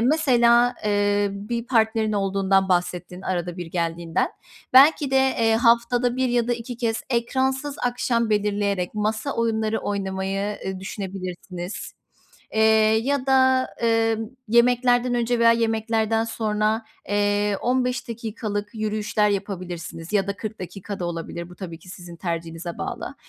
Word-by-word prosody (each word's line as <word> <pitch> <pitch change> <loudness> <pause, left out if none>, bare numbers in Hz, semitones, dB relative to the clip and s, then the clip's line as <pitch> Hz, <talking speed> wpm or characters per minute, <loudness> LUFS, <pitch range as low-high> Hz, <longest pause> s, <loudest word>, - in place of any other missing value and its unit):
mesela, 245 -3 +4
eee, 205 0 +2
bir 230 +4 -4
partnerin 220 -2 +2
olduğundan 195 -1 +1
bahsettin, 180 0 -1
arada 175 -1 -3
bir 175 -2 -5
geldiğinden. 165 -1 -1 0.4
Belki 280 +1 +6
de, 270 - +2
eee, 235 -4 +3
haftada 240 +1 +3
1 260 -1 +1
ya 240 -1 +1
da - - +2
2 240 +1 -5
kez 225 -2 -1
ekransız 265 +4 0
akşam 240 -2 0
belirleyerek 205 -3 0
masa 215 +5 -1
oyunları 225 -1 0
oynamayı, 195 0 -2
ııı, 190 -1 -4
düşünebilirsiniz. 185 -1 -6 0.6
Eee, 220 - +2 0.4
ya 280 -1 0
da, 260 -1 +4
eee, 225 -1 +2 0.3
yemeklerden 245 +1 +3
önce 240 0 0
veya 230 0 +6
yemeklerden 225 -1 +1
sonra, 220 0 -1 0.2
eee, 205 0 +1
15 250 0 0
dakikalık 215 -3 -4
yürüyüşler 215 -1 0
yapabilirsiniz 180 -3 -5
ya 200 -2 +2
da 200 - -2
40 215 0 -6
dakika 195 +2 -7
da 175 - -2
olabilir. 170 0 -5
Bu 180 - -13
tabii 170 -3 -8
ki 180 - -16
sizin 175 -2 -10
tercihinize 165 0 -5
bağlı. - - -5
215 Hz, 135 wpm, -23 LUFS, 190-235 Hz, 0.6 s, Belki